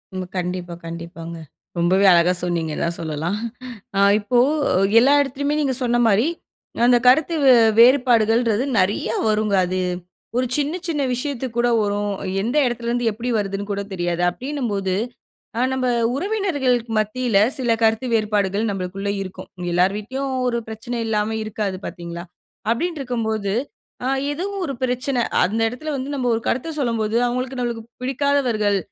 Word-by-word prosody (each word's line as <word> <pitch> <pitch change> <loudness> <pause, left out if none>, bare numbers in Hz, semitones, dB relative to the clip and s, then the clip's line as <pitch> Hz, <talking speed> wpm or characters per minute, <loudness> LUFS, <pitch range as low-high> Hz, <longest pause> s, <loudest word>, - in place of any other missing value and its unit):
ம். 185 -1 -4
கண்டிப்பா, 180 -1 -3
கண்டிப்பாங்க. 170 0 -7 0.4
ரொம்பவே 185 +3 +3
அழகா 175 +1 +5
சொன்னீங்க 170 -3 -1
தான் 170 0 -1
சொல்லலாம் 160 +5 -2 0.6
அ - - +3 0.2
இப்போ 220 +4 0 0.6
எல்லா 270 +4 +5
இடத்துலயுமே 285 +2 -1
நீங்க 280 -3 +1
சொன்ன 240 -1 +2
மாரி, 215 +3 +3 0.6
அந்த 245 0 +6
கருத்து 310 +6 +5
வே 260 - +8 0.3
வேறுபாடுகள்ன்றது 235 -2 +4 0.2
நிறைய 185 +3 +1 0.2
வருங்க 215 -1 +1
அது. 185 +1 -2 0.6
1 255 - +2
சின்ன, 295 +1 0
சின்ன 295 -4 0
விஷயத்துக்கு 255 -2 -4
கூட 240 0 +3
வரும். 205 0 -1 0.3
எந்த 240 +8 -1
இடத்துல 240 -1 -3
இருந்து 240 -1 +1
எப்பிடி 235 +4 -4
வருதுன்னு 200 0 -3
கூட 200 0 -2
தெரியாது. 175 -1 -1
அப்பிடின்னும்போது, 220 -5 -3 0.7
அ - - +2
நம்ப 255 -1 0 0.3
உறவினர்களுக்கு 285 - 0
மத்தியில 220 0 0 0.2
சில 250 -3 0
கருத்து 225 +2 +2
வேறுபாடுகள் 210 -1 0
நம்மளுக்குள்ள 195 +1 -3
இருக்கும். 185 -1 -8 0.2
எல்லார் 180 +3 +3
வீட்டுலயிலும் 260 +5 -3
1 235 -1 0
பிரச்சனை 230 +2 -5
இல்லாம 215 0 0
இருக்காது 205 -3 -3
பாத்தீங்களா? 170 0 -7 0.5
அப்பிடின்டு 315 +5 -1
இருக்கும் 240 -3 -2
போது 205 -3 -1 0.5
அ - - +1 0.2
ஏதோ 325 +6 -3 0.2
1 275 - -3
பிரச்சன 250 0 0 0.2
அந்த 210 +5 -2
இடத்துல 310 +6 -5
வந்து 270 +2 -4
நம்ப 255 -3 -1
1 225 - -3
கருத்த 260 +7 -1
சொல்லும்போது, 230 -4 0
அவுங்களுக்கு 255 +2 -3
நம்மளுக்கு 235 -2 -3 0.2
பிடிக்காதவர்கள். 255 -6 +1
225 Hz, 145 wpm, -21 LUFS, 195-255 Hz, 0.7 s, வே